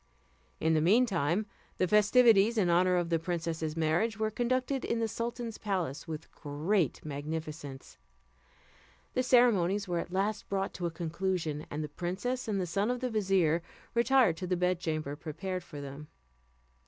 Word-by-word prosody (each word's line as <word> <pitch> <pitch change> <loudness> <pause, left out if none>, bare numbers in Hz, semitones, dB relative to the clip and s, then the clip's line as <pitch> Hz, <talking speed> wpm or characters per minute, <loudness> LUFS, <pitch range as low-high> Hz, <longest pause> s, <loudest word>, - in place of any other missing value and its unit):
In 160 0 +2
the 155 - +3
mean 215 +10 +5
time 175 0 0 0.3
the 185 - +2
festivities 210 +2 +5
in 180 -5 +3
honour 180 +1 +4
of 175 -1 0
the 165 -1 +2
princess's 165 -2 -3
marriage 165 +8 +1
were 220 0 0
conducted 255 +3 0
in 230 - -1
the 225 0 0
sultan's 230 0 -4
palace 180 -9 -2
with 160 -1 -7
great 155 - -1
magnificence. 150 - -6 1.1
The 255 - +2
ceremonies 210 -6 +3
were 175 -1 0
at 170 - -5
last 200 +3 -1
brought 195 0 -1
to 175 - -2
a - - -1
conclusion, 165 -2 -2
and 150 +1 -3
the - - -3
princess 190 - -3
and 205 -3 0
the 185 - 0
son 200 +6 0
of 250 0 -1
the 255 -1 -1
vizier 190 -6 +2 0.3
retired 235 -6 +4
to 185 - -4
the 180 0 0
bedchamber 165 -5 -1
prepared 175 +5 -5
for 145 - -9
them. 140 +2 -8
180 Hz, 165 wpm, -31 LUFS, 160-215 Hz, 1.1 s, mean